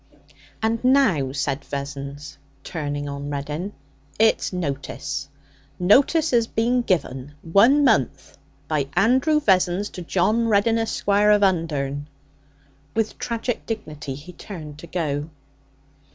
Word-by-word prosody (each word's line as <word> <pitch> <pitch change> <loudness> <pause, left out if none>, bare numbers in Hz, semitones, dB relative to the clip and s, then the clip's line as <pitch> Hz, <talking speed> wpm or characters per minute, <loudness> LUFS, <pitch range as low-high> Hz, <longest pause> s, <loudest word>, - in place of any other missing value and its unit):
'And 225 +1 0
now,' 225 - +3
said 140 0 -2
Vessons, 140 0 -6 0.2
turning 145 -3 -4
on 140 0 -5
Reddin, 150 +7 -4 0.5
'it's 220 +1 +3
notice. 140 -4 -4 0.5
Notice 280 - +4
has 235 -2 +3
been 240 +3 +1
give 185 -10 +1 0.4
one 230 - +5
month 140 - +1 0.3
by 150 -3 0
Andrew 265 +6 +3
Vessons 190 -4 +2
to 180 - -7
John 215 +7 +1
Reddin, 225 +2 +3
Esquire, 210 -2 +2
of 210 -1 +5
Undern.' 145 -6 0 0.9
With 225 -1 -1
tragic 235 0 -3
dignity 150 - -5
he 150 +6 -11
turned 155 -6 -9
to 170 - -10
go. 150 -4 -2
180 Hz, 115 wpm, -23 LUFS, 145-225 Hz, 0.9 s, one